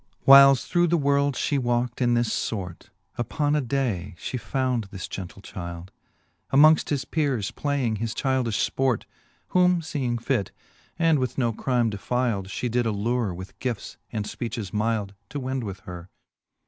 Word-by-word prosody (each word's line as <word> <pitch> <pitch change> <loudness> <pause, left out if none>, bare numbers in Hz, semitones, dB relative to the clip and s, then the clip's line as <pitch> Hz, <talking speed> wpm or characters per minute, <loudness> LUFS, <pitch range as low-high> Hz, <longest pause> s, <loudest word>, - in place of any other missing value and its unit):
VI. - - -41
Whiles 135 -1 +8
through 175 0 +2
the 170 +1 +2
world 140 -1 +2
fhe 145 - 0
walked 120 0 -1
in 120 -1 +3
this 120 -1 0
fort, 90 -6 -6
' 100 - -38
Upon 145 +5 0
a 150 - +2
day 115 -9 -2
fhe 125 - -4
found 130 -3 -1
this 95 -2 -7
gentle 95 +1 -8
childe, 85 -1 -7 0.6
Amongft 155 +3 +6
his 140 -3 -1
peres 140 -8 -1
playing 135 -6 -1
his 115 +2 -3
childilh 130 -2 0 0.2
fport: 130 -4 0 0.5
Whom 180 -1 +4
feeing 140 -7 -2
fit, 120 -4 -1 0.5
and 165 -3 +3
with 130 -1 -2
no 120 -4 +1
crime 120 -1 0
defilde. 105 -1 -1
She 125 - -3
did 120 0 0
allure 110 +1 0
with 95 +2 -9
gifts 125 -5 -4
and 105 -3 -3
fpeaches 115 -3 -5
milde, 105 -2 -1 0.2
To 145 - -4
wend 130 -1 -3
with 95 -3 -6
her. 90 0 -9
120 Hz, 165 wpm, -25 LUFS, 105-140 Hz, 0.6 s, Whiles